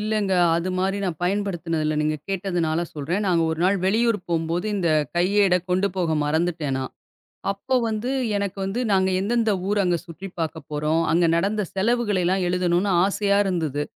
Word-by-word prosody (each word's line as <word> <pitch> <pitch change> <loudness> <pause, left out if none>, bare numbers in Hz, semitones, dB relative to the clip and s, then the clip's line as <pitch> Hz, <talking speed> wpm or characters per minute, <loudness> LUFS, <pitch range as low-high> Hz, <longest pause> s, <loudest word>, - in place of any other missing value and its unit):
இல்லங்க. 210 -2 0 0.2
அது 170 +2 -2
மாரி 195 +2 0
நான் 170 -5 -3
பயன்படுத்தினது 175 -4 -1
இல்ல. 155 - 0
நீங்கக் 155 -1 -2
கேட்டதுனால 175 -4 -1
சொல்றேன். 170 +8 -2
நாங்க 170 -2 +3
ஒரு 160 - -3
நாள் 195 +2 +3
வெளியூர் 225 +2 +2
போம்போது 170 +3 -1
இந்த 180 -4 0 0.3
கையேட 190 +1 +3 0.2
கொண்டு 185 +2 +2
போக 170 -3 0
மறந்துட்டேன் 160 -2 0
நான். 130 - -5 0.6
அப்ப 255 +6 -1
வந்து 220 +3 -2 0.3
எனக்கு 200 -1 -3
வந்து 195 +6 -2
நாங்க 190 0 +3
எந்த 200 +5 -1
எந்த 225 -2 +2 0.2
ஊர் 205 0 +1
அங்க 175 -1 +2
சுற்றி 175 +4 -8
பார்க்கப் 160 -2 -4
போறோம். 150 +2 0
அங்க 170 +1 +4
நடந்த 205 +4 0
செலவுகளை 210 -2 +1
எல்லாம் 185 +1 +1
எழுதணும்னு 180 +2 +1
ஆசையா 200 0 +1
இருந்தது. 160 -7 -1
185 Hz, 170 wpm, -23 LUFS, 165-200 Hz, 0.6 s, அங்க